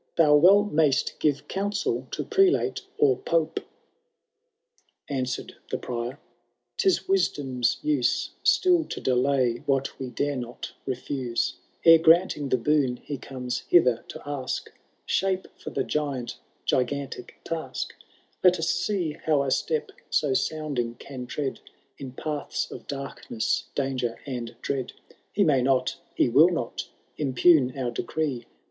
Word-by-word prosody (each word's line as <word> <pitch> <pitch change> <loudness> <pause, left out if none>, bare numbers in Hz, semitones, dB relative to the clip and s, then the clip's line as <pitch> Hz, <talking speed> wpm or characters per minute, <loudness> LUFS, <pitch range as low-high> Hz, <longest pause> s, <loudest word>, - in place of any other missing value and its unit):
Thou 150 -3 +6
well 190 +7 +7
xnayst 155 -8 +1
give 145 -2 0
counsel 200 +2 -1
to - - -3
Prelate 390 -4 +2 0.2
or 430 -2 +4
Pope. - - 0
XI. - - -18 1.5
Answered 130 -2 -3
the - - -1
Prior 120 +2 -4 0.3
— - - -52
*Tia 390 - +4 0.2
wisdom^ 135 - +1
use 145 -5 +1
StiU 355 -3 +4
to - - -4
dekty 125 -2 +1
what 135 0 0
we 130 -1 -4
dare 140 +3 -1
not 120 -1 -6 0.2
refuse; 125 -1 -2 0.3
Eie 165 -1 +9
granting 160 -3 +4
the 130 - +3
boon 135 -1 +2
he 145 -3 -5
comes 125 -1 -4
hither 125 -9 +4
to - - -9
ask, 140 -3 -3 0.3
Shape 190 -1 0
for - - -8
the 135 - -1
giant 140 -6 -3 0.3
gigantic 135 -1 -1
task; 165 -1 -4 0.5
liOt 180 -1 +6
us 165 +1 -1
see 180 -2 0
how 150 -3 +3
a 135 - -1
step 155 +2 0 0.2
so 145 -3 +2
sounding 135 -6 -1
can 125 -2 -8
tread 140 +1 -3 0.4
In 130 -2 -7
paths 150 +1 -3
of - - -9
darkness, 140 -5 -3
danger, 130 -4 -1
and 120 -4 -5
dread; 130 -3 -2 0.4
He 205 - +2
max 140 -7 +3
not, 130 -1 +1 0.2
he - - +3
will 145 +9 +6
not, 165 -10 -3 0.3
impugn 135 -1 +4
our 125 -2 -1
decree. 135 0 -3
140 Hz, 140 wpm, -26 LUFS, 125-160 Hz, 1.5 s, Eie